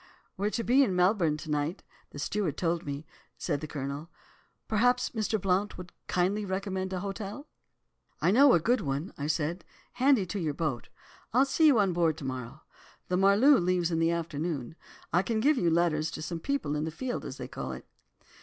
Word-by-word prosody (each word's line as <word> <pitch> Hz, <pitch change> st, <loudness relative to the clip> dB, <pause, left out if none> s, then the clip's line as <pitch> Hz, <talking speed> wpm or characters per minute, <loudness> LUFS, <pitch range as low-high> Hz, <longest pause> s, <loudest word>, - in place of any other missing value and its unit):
"'We're 200 Hz, +2 st, 0 dB
to 230 Hz, +2 st, -2 dB
be 255 Hz, +4 st, +4 dB
in 195 Hz, -8 st, 0 dB
Melbourne 180 Hz, -4 st, +3 dB
to 155 Hz, 0 st, -7 dB
night, 150 Hz, +5 st, -1 dB, 0.3 s
the -, -, -11 dB
steward 170 Hz, +1 st, -2 dB
told 170 Hz, -2 st, -1 dB
me,' 140 Hz, +2 st, -4 dB, 0.3 s
said 145 Hz, +2 st, -2 dB
the 155 Hz, -, -5 dB
Colonel; 145 Hz, +2 st, -5 dB, 0.6 s
'perhaps 245 Hz, +3 st, +2 dB
Mr. 220 Hz, -1 st, -1 dB
Blount 195 Hz, +2 st, 0 dB
will 180 Hz, -, -7 dB, 0.2 s
kindly 190 Hz, +4 st, +1 dB
recommend 190 Hz, -1 st, -3 dB
an 185 Hz, -1 st, -3 dB
hotel?' 200 Hz, +6 st, -5 dB, 0.7 s
"'I -, -, +3 dB
know 270 Hz, +5 st, +7 dB
a -, -, +5 dB
good 240 Hz, +8 st, +1 dB
one,' 145 Hz, +4 st, -3 dB
said 160 Hz, +3 st, -1 dB, 0.3 s
I, -, -, -9 dB
'handy 265 Hz, -8 st, +5 dB
to 190 Hz, +3 st, -4 dB
your 155 Hz, -5 st, -2 dB
boat. 150 Hz, -7 st, -3 dB, 0.4 s
I'll 260 Hz, +3 st, +5 dB
see 315 Hz, +3 st, +3 dB
you 280 Hz, -5 st, +6 dB
on 195 Hz, -4 st, +3 dB
board 165 Hz, -2 st, +1 dB
to 140 Hz, -, -7 dB
morrow. 130 Hz, -3 st, -6 dB, 0.5 s
The 180 Hz, -, +1 dB
Marloo 205 Hz, +9 st, +6 dB
leaves 175 Hz, -1 st, +1 dB
in 165 Hz, -, 0 dB
the 165 Hz, 0 st, +3 dB
afternoon. 160 Hz, -4 st, -3 dB, 0.4 s
I 175 Hz, -, +5 dB
can 220 Hz, +2 st, -1 dB
give 280 Hz, +4 st, +3 dB
you 170 Hz, -, +2 dB
letters 165 Hz, -2 st, +2 dB
to 155 Hz, -, -5 dB
some 165 Hz, +1 st, -4 dB
people 275 Hz, -, -1 dB
on 150 Hz, +1 st, -1 dB
"the -, -, -2 dB
field" 245 Hz, +10 st, -4 dB
as -, -, -7 dB
they -, -, -6 dB
call -, -, -5 dB
it. -, -, -8 dB
180 Hz, 200 wpm, -29 LUFS, 155-210 Hz, 0.7 s, know